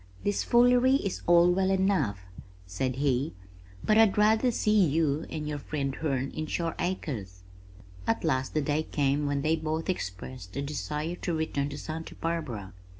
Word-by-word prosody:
"This 205 - 0
foolery 245 +2 +5
is 200 -9 -2
all 175 0 +6
well 190 +1 +2
enough," 190 - +1 0.4
said 120 +8 -2
he, 135 - 0 0.5
"but 215 +1 +4
I'd 220 -3 +5
rather 220 +4 +4
see 215 -3 +3
you 155 -1 +1
and 150 -1 -4
your 150 -1 -3
friend 140 -2 -3
Herne 135 -3 -2
in 155 - -4
Shore 165 +1 -1
Acres." 110 - -4 0.6
At 115 - +1
last 130 +2 0
the 155 - +3
day 150 +2 +1
came 145 -1 0
when 140 -1 -1
they 155 +1 +3
both 160 +3 -2
expressed 90 - -7
a 140 - -1
desire 150 +3 -3
to 175 - -2
return 145 -3 -1
to 145 - -6
Santa 160 +1 -6
Barbara. 135 - -4
155 Hz, 165 wpm, -28 LUFS, 135-180 Hz, 0.6 s, all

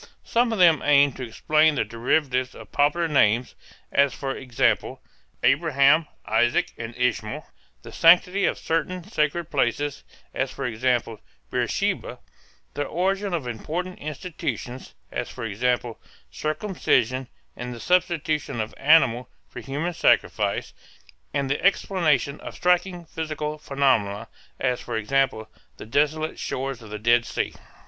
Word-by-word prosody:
Some 235 0 +1
of 225 - -1
them 170 -5 +5
aim 140 -1 +5
to - - -10
explain 155 +6 +2
the 135 - +1
derivation 125 +3 -1
of - - -13
popular 150 +4 +2
names, 120 -5 +2 0.4
as 140 -2 +3
for 135 -1 -3
example, 125 -3 0 0.4
Abraham, 145 +2 +4 0.2
Isaac, 110 +3 +1
and 115 0 -7
Ishmael, 125 -1 -1 0.4
the - - -10
sanctity 180 +4 +5
of - - 0
certain 175 +2 -2
sacred 160 +2 -1
places, 145 +1 0 0.3
as 130 - -1
for 135 - -5
example, 120 -2 -1 0.3
Beersheba, - - -1 0.6
the 145 - -2
origin 195 +5 -1
of 155 -7 -4
important 165 - -4
institutions, 145 -4 -5 0.2
as - - -3
for - - -6
example, 120 +2 -1 0.3
circumcision 150 - 0 0.3
and 125 0 -6
the 120 - -8
substitution 160 -6 0
of 110 0 -3
animal 130 -5 +4 0.2
for - - -8
human 145 +9 -3
sacrifice, - - +1 0.6
and 140 -1 -1
the 140 +2 -2
explanation 160 -8 +2
of - - -9
striking 180 0 +1
physical 155 -1 -4
phenomena, 115 -8 0 0.3
as 125 -2 0
for 120 -2 -4
example 110 0 0 0.3
the - - -9
desolate 150 +6 0
shores 135 -1 -4
of 110 - -12
the 105 - -5
Dead 120 +2 +3
Sea. - - -3
140 Hz, 135 wpm, -24 LUFS, 120-160 Hz, 0.6 s, them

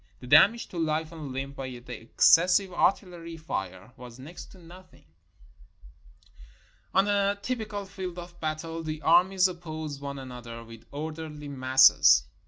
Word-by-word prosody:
The - - -12
damage 195 - +5
to 175 - -6
life 160 0 -1
and 155 -5 -8
limb 135 +1 -5
by 135 -1 -6
the 125 -1 -9
exces 125 +8 +3
sive 195 -3 0
artillery 175 -3 -1
fire 95 - -6
was 125 -1 -12
next 145 +7 -10
to - - -17
nothing. 180 +2 -16 1.9
On 195 +2 +2
a 200 0 +1
typical 215 -4 -4
field 185 -2 -7
of 175 0 -10
battle 160 +1 -4
the 155 -1 -6
armies 180 +3 +4
oppose 160 -5 -7
one 140 0 -6
an 130 -1 -9
other 115 -1 -9
with 115 -1 -14
orderly 150 0 -7
masses. 130 - +5
160 Hz, 150 wpm, -27 LUFS, 135-180 Hz, 1.9 s, damage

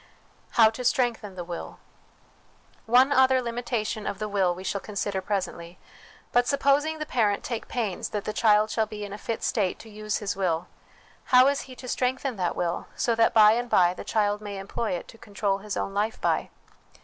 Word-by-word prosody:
How 220 -2 +6
to 250 +3 -6
Strengthen 235 -5 0
the 180 - -5
Will. 170 0 -7 1.1
One 255 +4 +5
other 260 -1 +5
limi 240 -1 -3
tation 220 -3 -2
of - - -5
the 215 +1 -3
will 190 -4 +1
we 185 - -9
shall 200 +1 -2
consider 200 -2 -3
presently; 185 -3 -4 0.5
but 245 0 +3
supposing 285 +3 +2
the 305 - -4
parent 215 -8 +1
take 240 -6 -4
pains 215 -7 -3
that 205 -1 -3
the 215 - -3
child 215 -1 +3
shall 220 -1 0
be 210 -1 -6
in 200 - -8
a 205 - -7
fit 225 0 -4
state 200 -5 0
to 220 - -13
use 215 0 -3
his 205 -3 -3
will, 180 -3 0 0.6
how 255 0 +6
is 280 - -1
he 255 - -11
to 250 - -10
strengthen 255 +1 -1
that 180 -2 -1
will, 170 -1 -2
so 235 - +1
that 230 0 +2
by 215 -1 +8
and 240 +2 -1
by 175 -4 +4
the - - -8
child 210 -1 0
may 205 -1 -6
employ 195 +3 -3
it 175 - -5
to 225 - -14
control 200 -1 -2
his 210 0 -5
own 195 - -3
life 210 +2 -1
by - - 0
215 Hz, 205 wpm, -26 LUFS, 200-245 Hz, 1.1 s, by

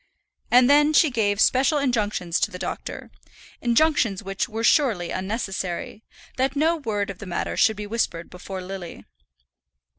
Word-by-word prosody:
And 245 +1 +6
then 295 +2 +5
she 310 -1 +5
gave 205 -4 0
special 270 +7 +3
injunctions 210 - 0
to - - +1
the 180 - -8
doctor - - -6 0.5
injunctions 235 -5 +2
which 195 0 -3
were 225 +1 -4
surely 225 - +2
unnecessary 190 -1 -4 0.4
that 265 +1 0
no 320 +4 +2
word 205 -8 -2
of 185 - -12
the 200 - -9
matter 175 - -3
should 220 -3 +3
be 210 - -5
whispered 205 -6 -2
before 185 +1 -7
Lily. 185 -2 -8
215 Hz, 150 wpm, -24 LUFS, 190-260 Hz, 0.5 s, And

